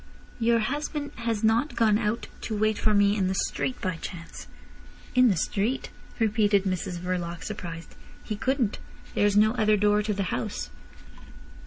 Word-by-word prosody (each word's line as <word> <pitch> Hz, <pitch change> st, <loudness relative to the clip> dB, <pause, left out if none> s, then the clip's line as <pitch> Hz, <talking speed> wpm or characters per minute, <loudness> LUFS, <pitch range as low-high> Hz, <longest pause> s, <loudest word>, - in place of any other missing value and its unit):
"Your 230 Hz, 0 st, +3 dB
husband 290 Hz, +4 st, -2 dB
has 230 Hz, -2 st, -2 dB
not 230 Hz, +7 st, +2 dB
gone 215 Hz, -2 st, +3 dB
out 225 Hz, +1 st, -1 dB, 0.2 s
to 215 Hz, -, -3 dB
wait 215 Hz, 0 st, +1 dB
for 215 Hz, -, +2 dB
me 205 Hz, 0 st, +4 dB
in 195 Hz, -3 st, +1 dB
the 190 Hz, -, -1 dB
street 255 Hz, +6 st, -1 dB
by 185 Hz, -3 st, -2 dB
chance?" 165 Hz, -1 st, -8 dB, 0.7 s
"In 250 Hz, 0 st, +6 dB
the 195 Hz, -, +3 dB
street!" 210 Hz, +9 st, -1 dB, 0.3 s
repeated 210 Hz, -3 st, +3 dB
Mrs 185 Hz, -2 st, -2 dB
Verloc, 175 Hz, -1 st, -3 dB
surprised. 170 Hz, -6 st, -7 dB, 0.3 s
"He 215 Hz, -, -3 dB
couldn't. 250 Hz, -1 st, 0 dB, 0.3 s
There's 205 Hz, 0 st, +3 dB
no 215 Hz, +1 st, +6 dB
other 215 Hz, -3 st, +3 dB
door 210 Hz, +1 st, +3 dB
to 210 Hz, 0 st, -1 dB
the 200 Hz, -, 0 dB
house." 65 Hz, -, -3 dB
210 Hz, 160 wpm, -27 LUFS, 190-230 Hz, 0.7 s, In